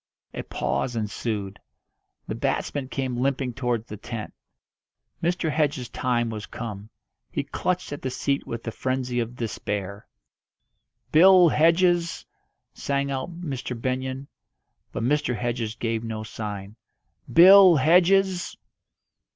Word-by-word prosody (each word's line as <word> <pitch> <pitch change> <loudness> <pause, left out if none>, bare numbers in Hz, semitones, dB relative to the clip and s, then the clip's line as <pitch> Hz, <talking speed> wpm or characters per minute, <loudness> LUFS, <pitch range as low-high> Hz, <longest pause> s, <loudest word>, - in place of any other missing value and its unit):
A - - -4
pause 125 - -2
ensued. 105 -2 -3 0.7
The - - -3
batsman 140 -3 -2
came 130 -2 -3
limping 135 -2 0
towards 120 -3 -2
the 105 -3 -8
tent. 110 +1 -7 0.9
Mr. 170 -1 0
Hedges' 145 -5 0
time 120 -2 -1
was 110 -1 -6
come; 105 -3 -7 0.4
he - - -2
clutched 180 -4 -2
at 145 - -7
the 130 - -2
seat 140 +2 -2
with 115 0 -5
the 115 - -4
frenzy 130 0 -2
of 120 +1 -3
despair. 105 -3 -4 1.0
"Bill 180 +2 +7
Hedges!" 170 +2 +2 0.5
sang 140 0 -2
out 165 +6 -5
Mr. 130 -6 -5
Benyon; 130 +2 -3 0.7
but - - -4
Mr. 135 -2 +1
Hedges 120 -2 -3
gave 115 -1 -2
no 110 -1 -4
sign. 105 -1 -7 0.5
"Bill 185 +1 +9
Hedges!" 180 +5 +3
130 Hz, 120 wpm, -25 LUFS, 115-155 Hz, 1.0 s, Bill